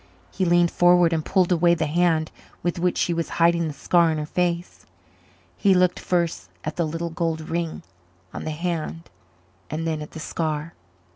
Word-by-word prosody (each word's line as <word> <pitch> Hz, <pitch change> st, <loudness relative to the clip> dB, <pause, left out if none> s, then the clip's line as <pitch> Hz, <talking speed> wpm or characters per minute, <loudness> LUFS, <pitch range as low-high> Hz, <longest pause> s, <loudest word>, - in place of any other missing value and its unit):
He 190 Hz, -, -1 dB
leaned 175 Hz, 0 st, +4 dB
forward 175 Hz, -1 st, +4 dB
and 160 Hz, -1 st, 0 dB
pulled 185 Hz, 0 st, +2 dB
away 175 Hz, 0 st, +4 dB
the 160 Hz, -2 st, -1 dB
hand 160 Hz, 0 st, +1 dB, 0.3 s
with 175 Hz, 0 st, -1 dB
which 180 Hz, +1 st, +1 dB
she 175 Hz, -, +1 dB
was 165 Hz, -1 st, -2 dB
hiding 170 Hz, 0 st, +3 dB
the 150 Hz, -, -4 dB
scar 170 Hz, +1 st, +3 dB
on 160 Hz, -, -1 dB
her 150 Hz, -, -3 dB
face. 175 Hz, +2 st, -2 dB, 0.7 s
He 195 Hz, -2 st, +3 dB
looked 180 Hz, 0 st, +3 dB
first 170 Hz, -2 st, -1 dB
at 155 Hz, -, -4 dB
the 170 Hz, -2 st, 0 dB
little 165 Hz, +2 st, -4 dB
gold 165 Hz, -1 st, -2 dB
ring 165 Hz, -1 st, -3 dB, 0.5 s
on -, -, -6 dB
the -, -, -3 dB
hand 165 Hz, 0 st, -4 dB, 0.6 s
and 160 Hz, +2 st, -3 dB
then 160 Hz, -2 st, -2 dB
at 150 Hz, -, -7 dB
the 160 Hz, -, -7 dB
scar. 155 Hz, 0 st, -3 dB
170 Hz, 185 wpm, -24 LUFS, 160-175 Hz, 0.7 s, leaned